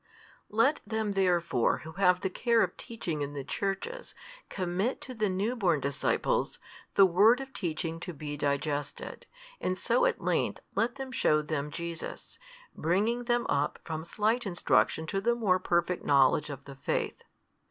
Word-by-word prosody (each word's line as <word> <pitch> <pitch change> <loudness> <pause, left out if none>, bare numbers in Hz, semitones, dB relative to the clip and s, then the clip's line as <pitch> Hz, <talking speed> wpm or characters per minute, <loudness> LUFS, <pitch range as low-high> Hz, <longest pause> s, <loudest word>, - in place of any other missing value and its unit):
Let 230 +8 +3
them 220 -2 -2
therefore 175 -10 +2
who 160 - -7
have 180 +1 +3
the 190 - 0
care 235 +2 +3
of 180 - -2
teaching 170 -10 -5
in 145 0 -3
the 140 -2 -4
Churches 200 - -3 0.3
commit 190 +6 -1
to 255 - -6
the 215 -4 0
new 200 +6 -1
born 180 - +2
disciples, 140 -1 0 0.4
the 195 - +8
word 205 +7 +5
of 270 0 -8
teaching 165 -2 -3
to 180 - -5
be 145 -2 -6
digested, 145 0 -2 0.3
and 185 0 -1
so - - +3
at - - -1
length - - 0
let 240 +3 0
them 270 -1 -6
shew 150 -10 +2
them 150 -1 -2
Jesus, 170 +1 -6 0.4
bringing 215 +9 +1
them 240 0 +1
up 145 +1 0
from 160 -1 -4
slight 220 +6 0
instruction 170 -2 +2
to 195 +5 -2
the 235 +3 +2
more 195 -6 +2
perfect 175 0 0
knowledge 140 +1 +4
of 140 -1 -7
the 140 - -10
faith. 140 - -2
185 Hz, 165 wpm, -30 LUFS, 155-225 Hz, 0.4 s, the